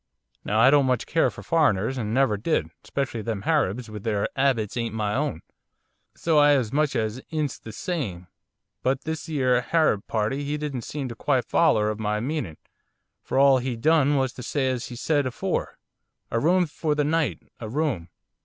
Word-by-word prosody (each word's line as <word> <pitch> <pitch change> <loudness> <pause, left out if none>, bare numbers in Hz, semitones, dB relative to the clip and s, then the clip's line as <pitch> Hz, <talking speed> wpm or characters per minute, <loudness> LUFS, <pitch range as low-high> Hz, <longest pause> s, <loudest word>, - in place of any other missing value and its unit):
Now 105 +2 0
I 130 +4 +7
don't 140 -2 +4
much 125 -2 +1
care 165 - +2
for - - -11
foreigners, 130 - +2
and 110 -5 -3
never 130 -3 +3
did, 115 +11 -1
especially 135 -5 -3
them 110 -2 -4
Harabs, 125 - 0
which 105 -1 -8
their 105 -2 0
'abits 130 -6 +1
ain't 115 -2 -2
my 105 -2 -1
own, 135 - -2 0.7
so 160 -2 +2
I 145 0 +6
as 125 -5 0
much 150 0 +1
'ints 130 +7 -2
the 110 - -9
same. 110 - -4 0.6
But 135 +1 0
this 160 0 -4
'ere 130 -5 +2
Harab 125 -7 +1
party, 115 +6 -1
he 145 +1 -2
didn't 140 -6 -4
seem 145 -3 -4
to 115 - -7
quite 130 +1 0
foller 110 -10 +3
of 110 - -6
my 105 0 -1
meaning, 125 - -3 0.6
for - - -3
all 135 -1 +6
he 125 -1 -3
done 145 +3 +3
was 130 -2 0
to - - -9
say 130 +1 0
as 125 -2 -3
he 125 - -8
said 145 +2 +1
afore, 125 - -3 0.5
"A 115 - +1
room 180 +6 +3
for 155 -1 -2
the 150 - +1
night, 160 0 0 0.2
a 110 - -6
room." 130 - -1
130 Hz, 190 wpm, -25 LUFS, 110-150 Hz, 0.7 s, I